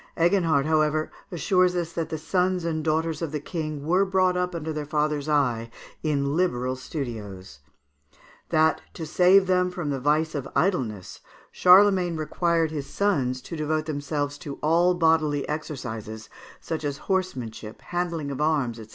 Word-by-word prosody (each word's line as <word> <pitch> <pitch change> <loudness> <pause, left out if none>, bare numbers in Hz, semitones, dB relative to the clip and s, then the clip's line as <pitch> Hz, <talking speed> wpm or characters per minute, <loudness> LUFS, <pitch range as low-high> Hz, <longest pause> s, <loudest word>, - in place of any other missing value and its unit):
Eginhard, 165 -5 +3
however, 155 0 +1 0.2
assures 180 +1 +2
us 170 -1 -2
that 165 -1 -3
the 160 - -3
sons 180 +2 0
and 160 -2 -2
daughters 160 0 0
of 165 -3 -3
the 150 - -2
King 155 -2 -5
were 180 +5 +3
brought 185 -1 +2
up 180 -1 -1
under 160 -1 -4
their 150 -1 -3
father's 150 -1 -1
eye 125 -6 +1 0.3
in 140 -2 0
liberal 130 -8 0
studios; 110 - -7 0.9
that, 155 0 +3
to 160 - -5
save 180 +4 +5
them 180 0 +2
from 175 -5 -4
the 135 - -2
vice 155 +4 +1
of 135 -3 -4
idleness, 130 - -1 0.3
Charlemagne 185 -2 +5
required 165 +1 0
his 145 -3 -4
sons 135 -9 0
to 170 - -7
devote 155 0 -1
themselves 145 -1 -3
to 140 -2 -6
all 170 +3 +3
bodily 160 -4 +2
exercises, 115 -8 -6 0.3
such 160 -1 -4
as 145 -1 -2
horsemanship, 125 - -3
handling 170 -5 -3
of 140 - -4
arms, 145 -7 +1
&c. 110 -2 -10
155 Hz, 155 wpm, -25 LUFS, 140-175 Hz, 0.9 s, save